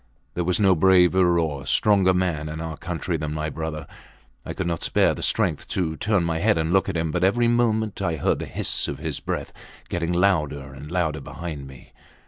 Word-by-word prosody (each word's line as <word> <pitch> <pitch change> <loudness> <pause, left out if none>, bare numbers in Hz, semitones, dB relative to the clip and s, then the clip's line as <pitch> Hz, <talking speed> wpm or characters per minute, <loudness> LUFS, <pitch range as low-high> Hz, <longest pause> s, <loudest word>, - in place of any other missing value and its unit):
There 90 - -1
was 90 +3 +1
no 95 -2 +5
braver 90 0 +4
or 75 -5 -2
stronger 100 -3 +4
man 90 -5 -1
in 80 +1 -6
our 80 -1 -5
country 85 +1 -3
than 75 0 -4
my 75 0 -3
brother. 80 -1 -5 0.6
I - - -6
could 95 - -3
not 85 -2 -2
spare - - +2
the - - -7
strength - - 0
to 80 -4 -2
turn 100 +2 +1
my 80 -1 -1
head 105 +2 +2
and 80 +1 0
look 95 0 +3
at 90 - -2
him, 80 -1 -1
but 90 +2 -1
every 115 +5 +3
moment 110 -3 +1
I 85 -4 0
heard 75 - 0
the - - -5
hiss - - 0
of - - -4
his - - -4
breath - - -4 0.4
getting 85 -1 -2
louder 75 -7 0 0.4
behind 80 -5 -7
me. 65 -2 -15
85 Hz, 200 wpm, -24 LUFS, 80-95 Hz, 0.6 s, no